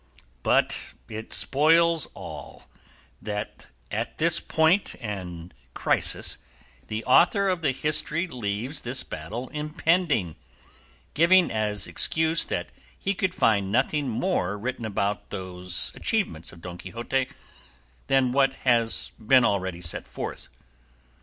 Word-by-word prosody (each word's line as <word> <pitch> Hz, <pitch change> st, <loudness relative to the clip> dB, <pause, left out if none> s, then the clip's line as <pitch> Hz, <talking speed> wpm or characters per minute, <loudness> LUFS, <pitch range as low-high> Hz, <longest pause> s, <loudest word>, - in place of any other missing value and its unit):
But -, -, +1 dB
it 110 Hz, 0 st, -7 dB
spoils 165 Hz, +2 st, +3 dB
all, -, -, -9 dB, 0.6 s
that 105 Hz, 0 st, -5 dB, 0.2 s
at 115 Hz, +3 st, -3 dB
this 165 Hz, +1 st, +4 dB
point 160 Hz, +5 st, +2 dB
and 90 Hz, -5 st, -6 dB, 0.2 s
crisis -, -, +2 dB, 0.5 s
the 110 Hz, +6 st, -4 dB
author 195 Hz, -, +5 dB
of 180 Hz, -2 st, -1 dB
the 150 Hz, -, +2 dB
history 150 Hz, +5 st, 0 dB
leaves 125 Hz, -, -3 dB
this 130 Hz, +2 st, -1 dB
battle 105 Hz, +12 st, -6 dB
impending, 150 Hz, -, 0 dB, 0.8 s
giving 175 Hz, +4 st, +5 dB
as 105 Hz, -2 st, 0 dB
excuse 160 Hz, +1 st, +3 dB
that -, -, -3 dB, 0.3 s
he 195 Hz, -, -1 dB
could 185 Hz, -1 st, -1 dB
find 100 Hz, -4 st, +2 dB
nothing 135 Hz, +4 st, +1 dB
more 110 Hz, -, -1 dB
written 120 Hz, +2 st, -4 dB
about 100 Hz, -1 st, -2 dB
these 90 Hz, -2 st, -2 dB
achievements 195 Hz, -, -2 dB
of 85 Hz, -, -15 dB
Don 90 Hz, 0 st, -8 dB
Quixote 120 Hz, +7 st, -2 dB, 0.8 s
than 135 Hz, -2 st, +3 dB
what 135 Hz, 0 st, +3 dB
has 115 Hz, -3 st, +2 dB
been 125 Hz, +2 st, +5 dB
already 95 Hz, -4 st, -1 dB
set 85 Hz, -, 0 dB
forth. -, -, -6 dB
125 Hz, 120 wpm, -26 LUFS, 100-160 Hz, 0.8 s, author